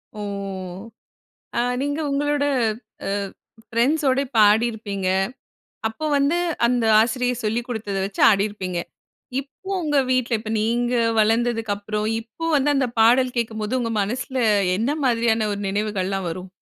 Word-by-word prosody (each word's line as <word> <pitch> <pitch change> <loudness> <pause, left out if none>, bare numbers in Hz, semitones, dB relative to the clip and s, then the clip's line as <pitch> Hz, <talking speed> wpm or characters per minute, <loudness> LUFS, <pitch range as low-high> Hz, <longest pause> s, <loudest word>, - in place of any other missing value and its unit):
ஓ! - - -7 1.4
ஆ, - - +3 0.2
நீங்க 285 +2 -1
உங்களோட 290 +1 +1 0.6
அ - - -1 0.6
ஃபிரெண்ட்ஸோடு 270 +3 +2
பாடியிருப்பீங்க. 210 -2 +2 0.8
அப்போ 225 +8 -6
வந்து 285 +5 +2 0.3
அந்த 240 -1 +1
ஆசிரியர் 245 +1 0
சொல்லிக் 235 +3 -1
கொடுத்தத 215 -4 -3
வச்சு 195 0 -4
ஆடியிருப்பீங்க. 195 -3 -1 0.6
இப்போ 285 +7 -14
உங்க 295 -3 +1
வீட்ல, 255 -1 +1
இப்ப 215 - -6
நீங்க 240 +3 0 0.3
வளர்ந்ததுக்கு 225 -1 +1
அப்புறம், 210 +1 -3
இப்ப 240 +9 -6
வந்து 285 +1 +2
அந்த 260 -2 +1
பாடல் 250 +3 +4
கேட்கும்போது 220 +1 -1
உங்க 230 -1 -2
மனசில 255 +6 -4 0.4
என்ன 230 +6 0
மாதிரியான 230 -3 +2
ஒரு 200 - -4
நினைவுகள்லாம் 195 -2 -1
வரும்? 185 +2 -7
230 Hz, 125 wpm, -22 LUFS, 210-255 Hz, 1.4 s, பாடல்